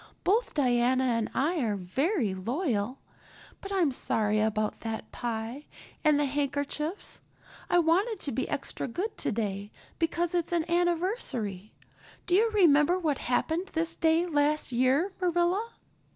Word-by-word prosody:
Both 440 +6 +1
Diana 255 -2 +3
and 230 -3 0
I 315 +6 0
are 220 -6 0
very 225 - 0
loyal. 235 - -1 0.6
But 395 - -7
I'm 360 -7 +2
sorry 215 -4 +1
about 215 0 0
that 225 -1 -5
pie 235 +4 -4 0.4
and 300 -2 +4
the 295 - +2
handkerchiefs. 285 +5 -2 0.5
I - - +4
wanted 365 +7 +2
to 280 - -2
be 260 - -2
extra 280 -1 -3
good 375 - -3
today 205 -2 -2 0.3
because 335 +1 0
it's 345 -1 -1
an 335 -1 +1
anniversary. 340 - -1 0.5
Do 355 - 0
you 440 +5 +5
remember 345 -5 +4
what 310 -6 -1
happened 320 +9 0
this 330 +1 0
day 325 +1 +3
last 300 -3 +1
year, 260 +10 +2
Marilla?" 360 +5 +1
295 Hz, 135 wpm, -29 LUFS, 235-350 Hz, 0.6 s, you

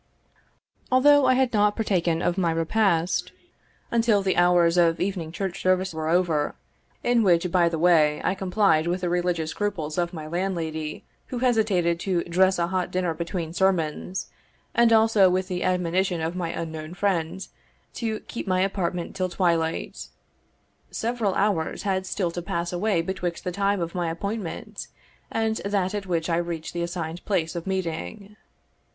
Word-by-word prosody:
Although 285 +1 +6
I 255 - +5
had 260 -2 +1
not 210 -1 +3
partaken 175 -6 0
of 175 - +1
my 185 -3 +1
repast 165 +1 +1 0.6
until 230 -4 +3
the 190 - +1
hours 175 -1 +4
of 170 -2 +3
evening 180 -5 -2
church 180 +1 -4
service 185 -1 +1
were 160 0 -3
over, 165 -4 +1 0.5
in 240 -1 +3
which, 180 -3 +3
by 175 -2 +4
the 165 - -3
way, 155 -3 +4
I 185 - +1
complied 190 -4 +2
with 180 +1 -1
the 180 - -1
religious 175 -2 0
scruples 180 -7 -2
of 175 0 0
my 160 -4 -7
landlady, 160 -3 -3 0.2
who 250 - -5
hesitated 215 -9 +2
to 180 -2 0
dress 185 +2 +2
a 170 - +1
hot 185 0 -1
dinner 180 -2 -1
between 170 0 -4
sermons, 180 -1 -1 0.4
and 235 -1 +4
also 220 -4 +5
with 185 +1 0
the 180 -1 -2
admonition 180 0 0
of 160 +2 -2
my 175 -2 -2
unknown 160 0 -5
friend, 185 -2 -1 0.5
to 220 -2 -3
keep 235 - -7
my 185 -1 +2
apartment 180 -3 -2
till 185 -1 -1
twilight, 170 -3 -1 0.8
several 225 -4 -1
hours 195 -5 0
had 190 -2 -1
still 180 -3 -1
to 175 - -4
pass 170 +1 -3
away 180 -1 +1
betwixt 175 -1 -3
the 180 - -2
time 200 +2 0
of 170 -1 -3
my 175 -2 -1
appointment 200 +2 -5 0.4
and 220 -1 0
that 200 -1 -1
at 205 -2 -4
which 165 -2 -1
I 165 -1 +1
reached 170 -2 -4
the 170 - -2
assigned 170 -1 -4
place 175 -5 -1
of 170 +1 -5
meeting. 190 - -4
180 Hz, 165 wpm, -25 LUFS, 170-195 Hz, 0.8 s, Although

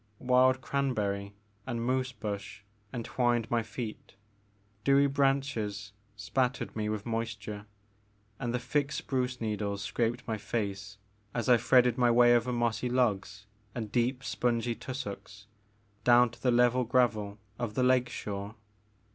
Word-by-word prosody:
Wild 130 +1 +3
cranberry 105 -9 -1 0.3
and 120 -2 -2
moose 130 0 0
bush 100 -3 -6 0.3
entwined 120 -1 0
my 120 -1 +2
feet, 110 -1 -7 0.7
dewy 140 0 +5
branches 135 -7 0 0.2
spattered 125 +5 -1
me 105 -1 -1
with 105 -1 -3
moisture, 110 -3 -4 0.7
and 120 -3 -2
the 125 - 0
thick 140 +2 -1
spruce 130 -3 -2
needles 105 -2 -2
scraped 120 +3 -1
my 110 -2 -2
face 100 -2 -3 0.4
as 120 -2 -1
I 125 -1 +7
threaded 125 +1 +4
my 120 -1 +5
way 120 0 +6
over 120 +1 +1
mossy 120 0 0
logs 110 -5 0 0.3
and 110 -4 -4
deep 125 +2 0
spongy 120 -1 0
tussocks 105 -5 -7 0.6
down 120 -1 +6
to - - -16
the 130 - +2
level 125 +1 +4
gravel 115 -4 +1 0.2
of 115 -3 -3
the 130 - +2
lake 125 -1 +3
shore. 100 -2 -5
120 Hz, 135 wpm, -30 LUFS, 105-125 Hz, 0.7 s, I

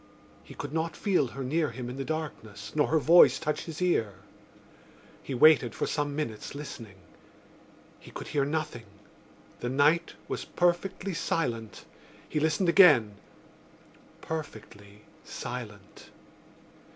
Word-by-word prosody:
He - - -13
could 145 0 -7
not 160 0 -2
feel 185 -10 +1
her 135 +3 -7
near 155 +4 0
him 125 0 -7
in 125 +2 -7
the 135 - -3
darkness 135 -10 -6
nor 150 -1 +2
her 160 - +2
voice 170 +3 +6
touch 150 -1 -3
his 165 +2 -5
ear. 115 - +1 1.1
He 135 - -5
waited 130 -4 +5
for - - -1
some 145 -1 -2
minutes 130 -5 -5
listening. 115 -8 -8 1.0
He - - -14
could - - -8
hear 145 -2 +1
nothing: 145 -6 -3 0.7
the 120 - -3
night 150 +6 +2
was - - -4
perfectly 180 +2 -1
silent. 115 - -3 0.4
He 150 - -2
listened 160 +4 +1
again: 150 - +6 1.1
perfectly 105 -9 -8 0.2
silent. 105 -5 -8
145 Hz, 125 wpm, -28 LUFS, 120-160 Hz, 1.1 s, voice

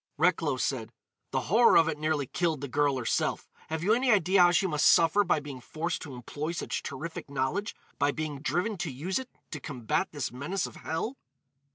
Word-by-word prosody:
Recklow 160 -4 +2
said: 125 -3 -2 0.4
"The - - 0
horror 230 +6 +5
of 165 - +5
it 150 -2 -2
nearly 155 -2 0
killed 160 0 -1
the 140 - -3
girl 145 0 +1
herself. 120 - -1 0.2
Have 160 +1 -3
you 210 +4 +4
any 250 +2 +2
idea 190 -2 +4
how 175 - +7
she 175 +2 +3
must 150 -5 +2
suffer 170 +5 +5
by 175 -4 +2
being 140 -3 -8
forced 160 +7 -3
to 140 -5 -7
employ 145 +6 -4
such 170 - -3
terrific 155 +2 -6
knowledge? 140 +10 -2 0.2
by 145 0 +3
being 150 -2 -4
driven 195 +6 -1
to 175 -2 -3
use 165 - -2
it 260 - -8 0.2
to 150 - -4
combat 120 -3 -2
this - - -3
menace 150 +10 -2
of - - -9
hell? 215 - -3
155 Hz, 200 wpm, -29 LUFS, 140-180 Hz, 0.4 s, how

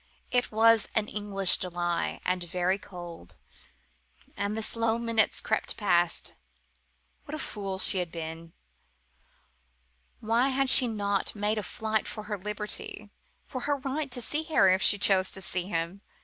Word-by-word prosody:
It 245 0 +1
was 225 0 +4
an 215 -2 +1
English 200 -3 0
July, 175 -1 -2
and 180 -1 0
very 180 +3 -1
cold. 170 - -11 1.0
And 205 +1 -2
the 220 - 0
slow 230 0 +1
minutes 230 -2 +1
crept - - -1
past. 175 -5 +1 0.9
What 295 - -6
a - - -4
fool 195 -9 -5
she 190 0 +2
had 175 -2 -3
been! 165 0 -7 1.7
Why 230 +4 +1
had 270 0 +2
she 255 - +10
not 205 -3 -1
made 210 +1 -1
a - - -2
fight 220 +1 -2
for 215 - -6
her 210 -1 -4
liberty 210 +1 -4 0.3
for 255 - -6
her 285 +2 -1
right 280 +2 -3
to 245 -1 -1
see 295 +6 +1
Harry 195 - +4
if 190 - 0
she 205 - +6
chose 190 -2 +3
to - - 0
see 180 -1 -3
him? 170 +1 -3
205 Hz, 155 wpm, -28 LUFS, 185-230 Hz, 1.7 s, she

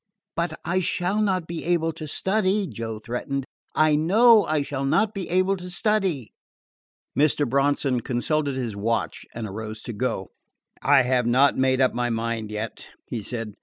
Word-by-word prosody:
"But 170 -2 -2
I 180 +2 +1
shall 180 +3 0
not 190 -5 +1
be 170 0 -5
able 165 -1 +1
to 155 -1 -7
study," 195 +4 +1
Joe 115 - -5
threatened. 130 +4 -4 0.3
"I 155 -1 +4
know 210 +8 +5
I 155 -2 +1
shall 140 -1 -4
not 205 +10 +2
be 195 -3 -5
able 185 +2 +2
to 180 0 -8
study." 185 - 0 0.8
Mr. 145 -1 +2
Bronson 140 0 +1
consulted 140 +4 -1
his 120 -5 -3
watch 115 +3 -2
and 115 -1 -4
arose 110 +2 -6
to 120 - -5
go. 105 -4 -2 0.5
"I 140 -1 +5
have 125 -1 +1
not 130 +4 +4
made 130 0 +2
up 130 - +3
my 120 0 0
mind 115 -1 -2
yet," 105 +1 -5 0.2
he 115 - -4
said. 115 0 -4
140 Hz, 165 wpm, -24 LUFS, 120-175 Hz, 0.8 s, know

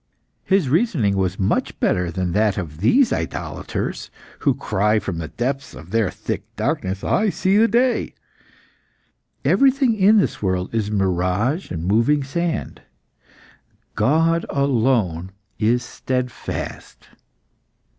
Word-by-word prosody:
His 190 -6 +2
reasoning 140 - +2
was 95 0 0
much 95 - -1
better 90 -1 +1
than 90 0 -2
that 105 +1 +1
of 80 -5 -5
these 240 - +4
idolaters, 80 - -4 0.3
who - - +2
cry 105 +3 +1
from 95 -5 -3
the 80 - -4
depths 135 - -3
of 80 +4 -12
their 115 -3 +2
thick - - -4
darkness, 95 +1 -2
'I 215 +1 +2
see 190 0 +1
the 225 +2 +5
day!' 245 +3 +1 1.3
Everything 270 -2 +4
in 210 +1 +5
this 200 - +1
world 95 -1 -1
is 110 -2 0
mirage 95 - 0
and 85 -1 -4
moving 115 +9 +2
sand. 170 +5 -3 1.1
God 165 +4 +2
alone 115 - +1 0.3
is 120 +3 +2
steadfast." 125 0 -5
115 Hz, 120 wpm, -21 LUFS, -, 1.3 s, the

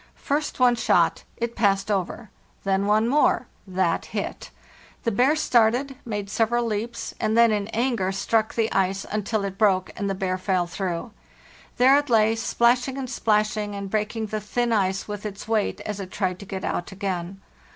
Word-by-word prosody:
First 295 0 -2
one 250 -1 +5
shot; 235 - +2
it 235 0 -3
passed 200 -2 +2
over, 195 +1 -2 0.3
Then 195 0 +1
one 215 +2 +3
more; 275 -1 +3 0.2
that 185 -3 0
hit. - - -5 0.5
~The 230 - +1
bear 255 +8 +3
started, 255 -1 +2
made 205 -3 -3
several 235 +3 +1
leaps, 230 +2 -3
and 220 +1 +1
then 235 -1 +6
in 205 -1 -1
anger 230 -4 0
struck 220 +3 0
the 225 -1 +1
ice 195 0 0
until 215 0 -1
it 195 -1 -5
broke, 190 -4 +3
and 200 -1 -2
the 195 - -1
bear 185 -1 -2
fell 185 -2 +1
through. 175 +3 -4 0.7
There 260 +2 +6
it 290 -1 -5
lay, 220 -1 +4
splashing 245 +3 +2
and 260 -2 -4
splashing 210 -3 0
and 200 -1 -6
breaking 215 +1 -1
the 215 0 -4
thin 235 +3 -1
ice 195 -2 0
with 205 -1 -5
its 205 -1 -6
weight 220 -2 0
as 210 -1 -5
it 190 -2 -6
tried 185 -1 -2
to 200 - -9
get 190 -1 -4
out 175 - -3
again. 190 -1 -4
210 Hz, 180 wpm, -24 LUFS, 195-235 Hz, 0.7 s, then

